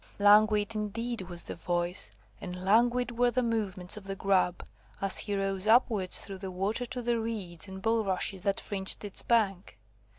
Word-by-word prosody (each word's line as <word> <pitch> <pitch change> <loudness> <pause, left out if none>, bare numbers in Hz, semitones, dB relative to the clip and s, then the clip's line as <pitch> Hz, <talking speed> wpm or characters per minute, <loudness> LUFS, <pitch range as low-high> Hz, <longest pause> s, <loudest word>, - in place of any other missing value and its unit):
Languid, 210 +1 +5
indeed, 225 +2 -3
was 175 -1 -3
the - - -6
voice, 175 - -2 0.3
and 180 +1 -6
languid 240 +3 +2
were 245 0 +5
the 250 +1 0
movements 210 -5 -2
of 205 - -10
the 195 0 -4
Grub, 190 -2 +1 0.3
as 195 -1 0
he 205 - 0
rose 195 0 -2
upwards 220 -5 +3
through 195 -1 -8
the 190 0 -5
water 200 +7 -2
to 250 0 -5
the 235 0 +1
reeds 205 -6 -4
and 190 0 -9
bulrushes 200 -4 0
that 200 0 0
fringed 195 +1 0
its 200 - -2
bank. 195 - 0
205 Hz, 170 wpm, -29 LUFS, 190-225 Hz, 0.3 s, Languid